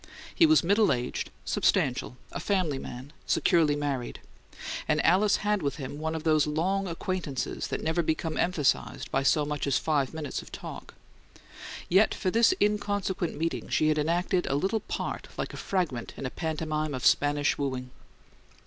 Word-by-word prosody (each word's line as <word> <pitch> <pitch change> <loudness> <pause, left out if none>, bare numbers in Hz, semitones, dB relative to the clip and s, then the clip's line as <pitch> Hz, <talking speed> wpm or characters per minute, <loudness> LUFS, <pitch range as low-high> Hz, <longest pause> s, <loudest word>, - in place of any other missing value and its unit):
He 330 - +5
was 315 -7 +5
middle 205 +5 +4
aged, 125 0 -2 0.2
substantial, 125 -1 +1
a - - -4
family 180 -9 0
man, 130 +5 -8
securely 160 -4 +3
married; 140 -4 -3 0.7
and 150 - +2
Alice 200 +4 +4
had 210 -1 +2
with 140 -2 -1
him 145 -1 -6
one 160 +1 -2
of 160 - -4
those 155 -2 +3
long 185 +6 0
acquaintances 170 -5 -3
that - - -4
never 160 +2 +1
become 160 0 -1
emphasized 165 -6 0
by 135 - +2
so 145 +2 +3
much 150 -1 -3
as 135 - +3
five 145 -5 0
minutes 155 -3 -4
of - - -14
talk; - - -8 0.9
yet 195 +5 +4
for 185 - -1
this 230 - +5
inconsequent 205 -4 0
meeting 165 +2 -2
she 155 - +2
had 155 0 +2
enacted 175 +3 +1
a 135 - 0
little 195 +9 +1
part - - -4
like - - -3
a - - -6
fragment 170 -11 -2
in - - -5
a 130 - -3
pantomime 155 -2 -2
of 130 - -4
Spanish 145 0 +3
wooing. 130 -3 -3
155 Hz, 165 wpm, -28 LUFS, 145-185 Hz, 0.9 s, He